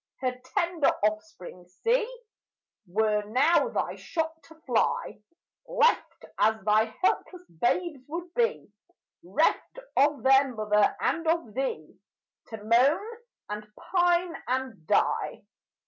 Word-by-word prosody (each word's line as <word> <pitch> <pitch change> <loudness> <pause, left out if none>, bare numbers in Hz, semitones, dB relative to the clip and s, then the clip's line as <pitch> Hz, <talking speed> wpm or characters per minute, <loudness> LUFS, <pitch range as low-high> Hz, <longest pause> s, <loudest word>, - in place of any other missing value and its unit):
Her 255 -1 -1 0.2
tender 340 -4 +2 0.2
offspring 210 -4 -3
see, 460 - 0 0.8
Were 210 +3 +1
now 265 - +3
thy - - -2
shot 320 -1 -3
to 320 - -16
fly, 230 -3 0 0.5
Left, - - +1
as 220 0 +3
thy 215 +1 +4 0.2
helpless 365 -1 0
babes 290 - -1
would 340 +3 -6
be, 475 0 0 0.5
'Reft - - 0 0.2
of 285 -3 +3
their 270 0 +5
mother 210 -1 +2
and 330 0 0
of 325 -10 0
thee, 190 - -4 0.5
To 220 -2 -9
moan, 270 - +3 0.4
and 210 0 -6
pine, 350 -1 +1
and 255 -9 -3
die. - - +1
265 Hz, 115 wpm, -27 LUFS, 215-345 Hz, 0.8 s, their